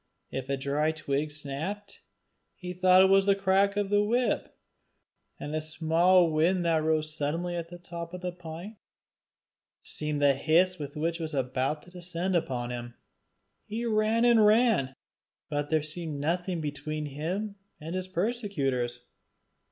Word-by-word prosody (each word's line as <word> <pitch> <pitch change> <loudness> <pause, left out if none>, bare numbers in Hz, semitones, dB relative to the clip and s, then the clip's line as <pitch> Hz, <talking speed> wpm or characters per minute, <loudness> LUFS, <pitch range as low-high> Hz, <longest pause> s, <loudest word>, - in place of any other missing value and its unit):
If 135 0 -5
a 140 - 0
dry 145 +4 0
twig 150 -1 -2
snapped, 150 +8 -5 0.6
he 180 -1 -6
thought 185 +1 +6
it 190 - +5
was 195 0 +5
the 200 - +5
crack 195 +1 +2
of 205 -1 0
the 205 0 +4
whip; 240 +4 0 0.8
and 145 - -5
a 155 - 0
small 165 +3 +3
wind 170 +4 +2
that 165 -2 +3
rose 155 -1 0
suddenly 165 +4 -2
in 170 - -2
the 175 - -9
top 170 -1 -7
of 180 - -9
a 180 - -1
pine, 175 +4 -9 1.0
seemed 150 -1 -3
the 145 -1 +5
hiss 165 +6 +2
with 145 -1 -6
which 165 +2 -1
it - - -6
was 155 -1 -4
about 135 +3 -1
to 180 - -16
descend 180 +1 -3
upon 125 -7 -1
him. 120 0 -6 0.7
He 225 +3 -4
ran 220 +1 +2
and 235 -2 +6
ran, 210 - +4 0.6
but 145 -1 0
still - - -21
there 155 -2 +2
seemed 155 -1 -5
nothing 175 +3 -1
between 150 +1 -4
him 180 +9 -4 0.2
and 160 +2 -6
his 185 0 -3
persecutors. 165 - -1
165 Hz, 160 wpm, -28 LUFS, 150-185 Hz, 1.0 s, thought